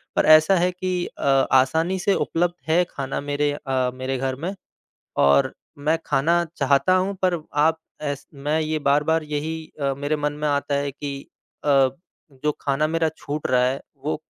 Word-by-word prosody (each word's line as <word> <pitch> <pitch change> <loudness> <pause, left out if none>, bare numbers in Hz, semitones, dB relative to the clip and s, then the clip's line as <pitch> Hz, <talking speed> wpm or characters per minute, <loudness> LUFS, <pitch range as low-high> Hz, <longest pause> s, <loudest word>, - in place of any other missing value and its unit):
पर - - +3
ऐसा 155 +4 +7
है 180 +1 +2
कि 180 -1 -2
अ, - - -9 0.3
आसानी 160 +8 +3
से 200 +2 +2
उपलब्ध 175 -1 0 0.2
है 175 +3 +4
खाना 135 0 -4
मेरे 145 +1 0
अ, 130 -3 -1
मेरे 130 +1 -3
घर 130 0 -2
में। 170 +8 -4 0.7
और 70 0 +4 0.4
मैं 160 - +4
खाना 165 +5 +2
चाहता 140 +6 +3
हूँ 190 +2 0
पर 185 -1 +3 0.3
आप 160 +1 +3 0.2
एस 145 -1 -4
मैं 145 +3 -1
ये 155 0 -1
बार-बार 150 +3 +2
यही 150 +2 -3 0.2
अ, 140 -1 +1
मेरे 145 +3 -1
मन 150 0 -1
में 150 +1 -3
आता 140 0 0
है 140 0 0
कि 145 +1 -6 0.5
अ, 150 - -1 0.6
जो 150 +3 -1
खाना 145 +2 +1
मेरा 165 0 +1
छूट 150 +1 -4
रहा 125 -1 +4
है 130 +2 0 0.2
वो 155 - 0
150 Hz, 175 wpm, -23 LUFS, 140-160 Hz, 0.7 s, ऐसा